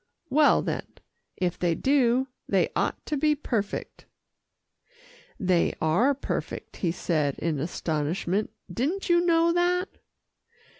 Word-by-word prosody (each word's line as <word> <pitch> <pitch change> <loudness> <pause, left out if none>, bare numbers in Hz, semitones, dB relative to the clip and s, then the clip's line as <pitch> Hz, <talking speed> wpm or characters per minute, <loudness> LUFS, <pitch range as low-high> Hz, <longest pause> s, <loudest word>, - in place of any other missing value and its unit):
"Well 295 +1 +5
then, - - -3 0.5
if 180 -1 -1
they 170 -2 +1
do, 260 - +2 0.2
they - - +2
ought - - -1
to 300 - -2
be 300 +2 +3
perfect." 225 -8 -4 1.3
"They 180 -3 +2
are 215 - +3
perfect," 275 - -5
he 175 - 0
said 155 -5 -1
in 155 -3 -1
astonishment. 170 +5 -1 0.2
"Didn't 320 - -1
you 345 0 +4
know 335 -1 +3
that?" 355 +2 +1
235 Hz, 115 wpm, -26 LUFS, -, 1.3 s, Well